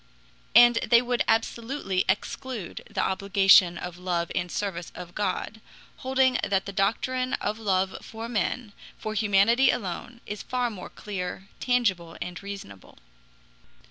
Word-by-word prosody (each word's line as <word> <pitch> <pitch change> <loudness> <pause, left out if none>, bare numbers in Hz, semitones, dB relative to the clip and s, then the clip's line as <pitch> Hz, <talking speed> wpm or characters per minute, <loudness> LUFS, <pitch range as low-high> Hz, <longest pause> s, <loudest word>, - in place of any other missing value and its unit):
And 240 0 +8
they 235 0 +5
would 245 0 0
absolutely 225 -3 0
exclude 210 +1 -3
the - - -1
obligation 195 -2 +5
of 175 0 -7
love 175 -2 -1
and 175 -1 -2
service 180 -4 -3
of 175 -1 -9
God, 210 +2 -3 0.4
holding 260 -1 +2
that 195 -1 +1
the 200 - -6
doctrine 255 +6 0
of 215 - -3
love 190 -3 0
for 225 +1 -7
men, 225 0 -2 0.2
for 215 - -4
humanity 220 +4 +4
alone, 225 +4 -3
is 210 0 -5
far 250 -2 -1
more 190 -4 -8
clear, 195 -1 -6
tangible, 195 -10 0
and 180 0 -6
reasonable. 195 - -9
200 Hz, 135 wpm, -26 LUFS, 185-235 Hz, 0.4 s, And